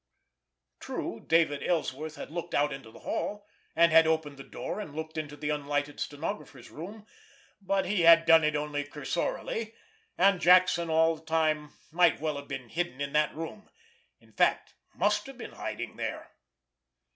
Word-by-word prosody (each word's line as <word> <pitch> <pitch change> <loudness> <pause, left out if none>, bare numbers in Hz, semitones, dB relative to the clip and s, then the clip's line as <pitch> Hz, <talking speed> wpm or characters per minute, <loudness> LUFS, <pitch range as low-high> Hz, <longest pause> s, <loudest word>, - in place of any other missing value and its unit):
True, - - -5
David 160 -3 +3
Ellsworth 155 -2 -2
had - - -8
looked 170 +1 -4
out 145 0 +2
into 135 -5 -9
the - - -15
hall, 205 0 -3 0.3
and 170 0 +5
had 160 0 +7
opened 160 -3 0
the 135 - -9
door - - -6
and 150 -9 -7
looked 160 0 -6
into 150 -2 -5
the 150 0 -2
unlighted 145 0 -2
stenographer's 145 - -5
room, 205 +7 -9 0.6
but 195 0 0
he 190 0 0
had 165 0 +7
done 165 -1 +7
it 150 0 +1
only 150 -1 -2
cursorily, 170 +9 -3 0.4
and 195 -2 +4
Jackson 180 -1 +5
all 160 0 +3
the - - -17
time 155 -2 0 0.2
might 175 0 +4
well 155 -1 -2
have 140 0 -8
been 135 -3 -6
hiding 170 -6 -2
in 140 0 -3
that 150 0 +2
room—in 455 - -12
fact, - - +1 0.2
must 210 +2 +1
have 270 -2 -10
been - - -8
hiding - - -6
there. - - -5
160 Hz, 165 wpm, -29 LUFS, 145-180 Hz, 0.6 s, had